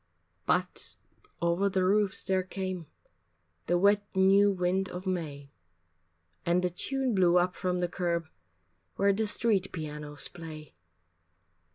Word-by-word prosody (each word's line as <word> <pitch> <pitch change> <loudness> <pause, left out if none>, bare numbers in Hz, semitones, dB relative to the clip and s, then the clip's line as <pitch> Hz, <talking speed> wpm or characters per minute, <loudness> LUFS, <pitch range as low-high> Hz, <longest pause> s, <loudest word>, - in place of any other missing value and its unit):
But 180 0 0 0.5
over 170 +4 +2
the 190 -1 +1
roofs 200 0 +2
there 190 -1 +1
came 185 -2 -5 0.8
The 175 - +3
wet 200 +2 +4
new 195 +2 +5
wind 185 +1 0
of 180 +2 -7
May, 150 -7 -4 0.9
And 175 +1 +2
a 180 - 0
tune 265 +7 -1
blew 180 -3 +4
up 180 +1 +2
from 180 -1 -1
the 175 - +1
curb 170 -2 -2 0.7
Where 200 0 +3
the 215 +2 0
street 205 -3 +2
pianos 150 -3 -4
play. 155 -3 -10
180 Hz, 130 wpm, -29 LUFS, 170-195 Hz, 0.9 s, new